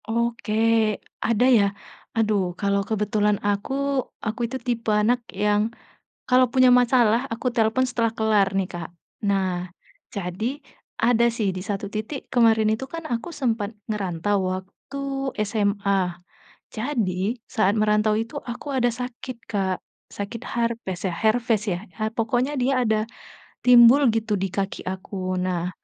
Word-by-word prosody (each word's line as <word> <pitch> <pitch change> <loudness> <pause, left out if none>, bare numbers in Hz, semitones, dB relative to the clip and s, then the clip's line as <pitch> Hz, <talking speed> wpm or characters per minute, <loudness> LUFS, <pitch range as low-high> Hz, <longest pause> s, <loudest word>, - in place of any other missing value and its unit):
Oke, 225 -1 +1 0.2
ada 230 +1 +2
ya. 205 - +4 0.5
Aduh 215 -3 +2 0.2
kalau 200 0 +1
kebetulan 210 -1 +1
aku, 205 +5 -1 0.5
aku 220 +3 -3
itu 260 - -3
tipe 235 -3 -2
anak 215 +4 +3
yang 205 +1 +1 0.7
kalau 255 0 +5
punya 255 -1 +6
masalah 245 -2 +4
aku 245 +2 -2
telepon 225 +2 +2
setelah 230 -2 0
kelar 215 -3 +3
nih, 190 -1 +1
Kak. 175 -2 -6 0.4
Nah 185 -2 0 0.5
jadi, 215 - -3 0.4
ada 235 0 +4
sih 225 -4 0
di 185 - -5
satu 200 +1 -3
titik 220 +7 -5
kemarin 225 -3 +4
itu 220 +5 -2
kan 330 0 -5
aku 235 +7 -3
sempat 230 -6 0 0.2
ngerantau 200 -1 0 0.2
waktu 190 +9 -9 0.4
SMA, 200 -2 +1 0.7
jadi 220 -3 -1
saat 210 -5 +2
merantau 210 0 +3
itu 225 +1 -4
aku 250 +4 -6
ada 245 -2 +2
sakit 250 +1 -6
Kak, 195 -4 -1 0.3
sakit 205 +3 -6
harpes, 230 -6 -2
herpes 220 +4 +1
ya? 175 - -1 0.2
A 215 - 0
pokoknya 245 +5 0
dia 255 0 +2
ada 220 -2 +1 0.6
timbul 250 +2 +7
gitu 220 -1 0
di 195 -1 -1
kaki 195 +1 -3
aku, 185 -1 -4
nah 180 -1 -1
220 Hz, 135 wpm, -24 LUFS, 200-240 Hz, 0.7 s, timbul